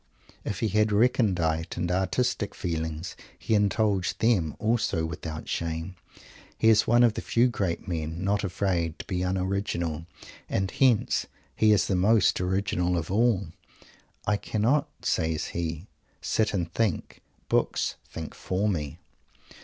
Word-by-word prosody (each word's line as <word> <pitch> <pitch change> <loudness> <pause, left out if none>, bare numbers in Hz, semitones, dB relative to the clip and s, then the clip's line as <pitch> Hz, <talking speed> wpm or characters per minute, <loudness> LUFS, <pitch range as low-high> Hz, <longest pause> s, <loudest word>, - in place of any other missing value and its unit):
If 95 - -4
he 110 - +1
had 105 +1 +2
recondite 95 -9 +1
and 85 0 -1
"artistic" 100 +4 0
feelings, 80 -1 -3 0.2
he - - -2
indulged 105 -2 +2
them 95 -10 +2
also 110 -7 0
without 80 0 -6
shame. 80 +2 -3 0.6
He 110 - +4
is 110 -1 +5
one 120 +1 +5
of 120 -3 +5
the - - -4
few 120 +2 +3
great 95 -6 -2
men 80 0 -3
not 100 +2 +1
afraid 90 -4 -1
to - - -8
be 90 -1 -2
un 95 +1 0
original, 85 -4 -2 0.4
and 95 -1 0
hence 125 -2 +2 0.3
he 110 -1 +4
is 105 -3 +4
the - - -1
most 100 +1 +3
original 90 -1 0
of 85 +1 -3
all. 105 -4 +2 0.8
"I 105 - +2
cannot," 130 +10 +1
says 80 -2 0
he, 85 0 -3 0.3
"sit 110 -1 0
and 85 -4 -2
think. 110 -8 -1 0.3
Books - - 0
think 80 -2 -7
for 95 +3 -1
me." 75 -9 -2
95 Hz, 145 wpm, -27 LUFS, 85-105 Hz, 0.8 s, is